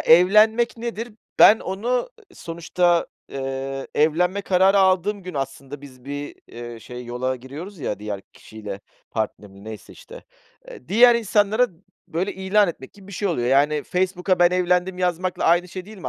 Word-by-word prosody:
evlenmek 215 +8 +5
nedir? 230 0 -5 0.3
Ben 220 - +8
onu 190 +5 -5
ı 250 - +1 0.3
sonuçta, 170 +1 0 0.2
eee, 135 0 -4
evlenme 175 +6 +2
kararı 190 +1 +4
aldığım 190 +2 +2
gün 180 0 -8
aslında 135 0 -5
biz 130 -3 -14
bir, 145 +1 -6
eee, 120 -1 -9
şey 125 +2 -9
yola 125 +2 -2
giriyoruz 150 +10 -9
ya 130 - -3
diğer 105 -1 -5
kişiyle, 105 -2 -9 0.3
partnerimle 105 -2 -5
neyse 110 -2 -9
işte. - - -13 0.4
Eee, 125 - -12
diğer 240 +5 +6
insanlara 220 +1 +2 0.4
böyle 185 +5 -2
ilan 190 +1 +2
etmek 135 -6 -8
gibi 200 -2 -17
bir 200 - -11
şey 200 +2 -2
oluyor. 125 -9 -1
Yani 145 +3 +3
Facebook'a 185 0 0
ben 175 0 +5
evlendim 180 0 +1
yazmakla 180 0 -1
aynı 175 +2 +3
şey 185 +1 -7
değil 210 +1 -12
mi 180 - -5
175 Hz, 160 wpm, -22 LUFS, 135-195 Hz, 0.4 s, Ben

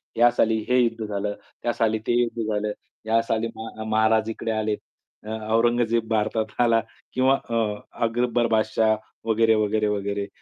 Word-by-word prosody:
ह्या 120 +1 +6
साली 110 -2 +2
हे 125 0 +4
युद्ध 115 -2 0
झालं, 105 0 -2 0.3
त्या 120 - +1
साली 110 -1 +1
ते 120 0 +3
युद्ध 120 -1 -2
झालं. 105 0 -1 0.3
या 115 +1 +3
साली 115 0 -1
म 110 0 -7
महाराज 110 0 +3
इकडे 115 0 -3
आले. 110 -1 0 0.5
अ, - - -7 0.3
औरंगजेब 115 -1 +2
भारतात 110 0 +1 0.2
आला 115 -1 +4 0.3
किंवा 130 +1 +4
अ, 115 - -1 0.5
अकबर 120 0 +1
बादशाह 110 0 +2 0.3
वगैरे, 110 0 +4
वगैरे, 110 0 +1
वगैरे. 100 0 -2
110 Hz, 155 wpm, -24 LUFS, 110-115 Hz, 0.5 s, ह्या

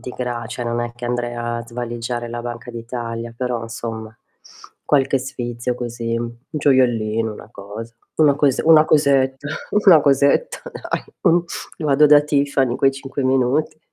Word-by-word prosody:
di 125 - -7
gra 120 -2 -3
cioè 120 +1 -5
non 120 0 -1
è 120 0 -3
che 120 - -8
andrei 120 0 -2
a 120 0 -3
svaligiare 120 0 -4
la 120 0 -5
Banca 120 0 -6
d'Italia, 115 0 -5
però 125 -2 -2
insomma, 115 -1 -6 0.7
qualche 135 -1 +2
sfizio 120 -2 -4
così, 115 -1 -3
un 120 0 -4
gioiellino, 115 -6 +2
una 105 - -11
cosa, 110 +2 -9 0.2
una 150 -3 +5
cose 145 -3 +2
una 155 -1 +7
cosetta 140 -2 +2 1.2
dai, - - -4 0.3
mh, 175 - +5 0.5
vado 150 +1 +5
da 145 0 +7
Tiffany 140 -3 +1
in - - -2
quei 135 0 +3
5 135 0 -5
minuti. 130 +4 +1
120 Hz, 145 wpm, -20 LUFS, 115-135 Hz, 1.2 s, una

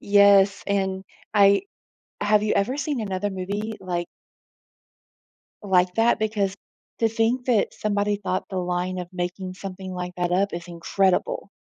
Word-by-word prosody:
Yes, 200 -1 +5
and 190 -1 -1 0.3
I 200 - +6 0.6
have 210 0 +3
you 215 - +1
ever 240 +7 +1
seen 290 -3 -2
another 205 -1 -2
movie 200 +3 -3
like 175 -2 -3 1.6
like 180 -2 +2
that? 225 +1 +3
Because 210 -3 0 0.4
to 225 - +3
think 230 +3 0
that 235 -5 +2
somebody 205 0 0
thought 185 -2 -2
the 190 - -2
line 180 +1 -2
of 180 -1 -5
making 185 +1 -4
something 190 0 -7
like 180 0 -5
that 175 -1 -1
up 195 +3 +1
is 170 +1 -6
incredible. 180 +3 0
195 Hz, 145 wpm, -24 LUFS, 185-210 Hz, 1.6 s, I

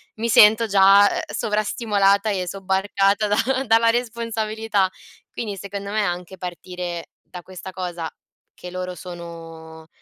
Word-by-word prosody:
mi 225 +2 -2
sento 220 +1 +6
già, 200 0 +6
ehm, - - -2
sovrastimolata 210 -1 +1
e 185 -2 -2
sobbarcata 195 +2 +1
da 260 +6 +1
dalla 230 0 +4
responsabilità. 225 -4 -1 0.4
Quindi 215 -4 -5
secondo 200 +1 -6
me, 215 +1 +1
anche 180 0 -4
partire 180 -1 -6
da 180 - -11
questa 185 +1 -9
cosa, 175 -3 -5 0.4
che 180 - -10
loro 185 0 -4
sono 165 -2 -10
195 Hz, 125 wpm, -22 LUFS, 180-215 Hz, 0.4 s, sento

